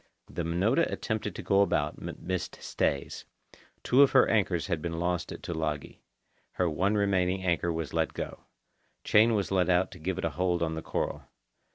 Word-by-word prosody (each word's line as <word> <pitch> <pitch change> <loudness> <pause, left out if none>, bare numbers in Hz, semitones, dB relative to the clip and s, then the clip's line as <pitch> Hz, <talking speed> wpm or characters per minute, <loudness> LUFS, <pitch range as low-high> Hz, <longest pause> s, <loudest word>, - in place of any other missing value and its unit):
The - - -4
Minota 95 - +1
attempted 110 -4 -3
to - - -6
go 100 0 +3
about, 75 -6 0
but - - -6
missed 95 0 -4
stays. 70 -1 -2 0.6
Two 130 +3 +4
of 140 - +5
her 130 - +6
anchors 95 -6 +1
had 85 -5 -2
been 85 0 -3
lost 90 0 -1
at - - -8
Tulagi. 80 -4 -3 0.5
Her 90 - +1
one 95 +6 +1
remaining 95 -2 +1
anchor 85 -1 +1
was 80 -3 -4
let - - 0
go. - - -6 0.6
Chain 110 +2 +4
was 100 -2 -1
let 95 -1 +2
out 90 +1 +2
to 90 - -11
give 90 +3 -3
it 95 - -2
a 85 - -1
hold 90 0 0
on 80 -1 -1
the 80 - -4
coral. - - -3
90 Hz, 190 wpm, -29 LUFS, 85-100 Hz, 0.6 s, her